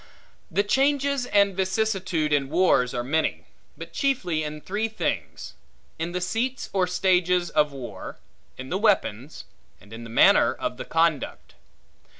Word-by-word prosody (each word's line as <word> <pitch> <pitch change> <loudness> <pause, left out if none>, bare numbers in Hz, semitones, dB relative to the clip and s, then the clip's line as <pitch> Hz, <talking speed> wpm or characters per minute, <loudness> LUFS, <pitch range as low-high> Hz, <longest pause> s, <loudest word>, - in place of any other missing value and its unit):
The 200 - +1
changes 275 +3 +1
and 200 -2 +3
vicissitude 190 -5 0
in 140 -2 +1
wars 160 -7 +3
are 120 - -1
many; 155 +5 -1 0.3
but - - -9
chiefly 215 - 0
in 150 0 -5
three 205 +7 -2
things; 220 -1 -4 0.5
in 165 +2 -3
the 180 - -2
seats 240 +8 -2
or 185 -2 +2
stages 180 -1 +1
of 150 0 +3
the 140 - -13
war; 115 -7 -8 0.4
in 130 +1 -8
the 185 - -1
weapons; 155 - 0 0.3
and 100 +3 -16
in 115 +1 -8
the 115 - -9
manner 115 - +5
of - - -4
the - - -6
conduct. 165 -4 -1
180 Hz, 155 wpm, -25 LUFS, 150-205 Hz, 0.5 s, manner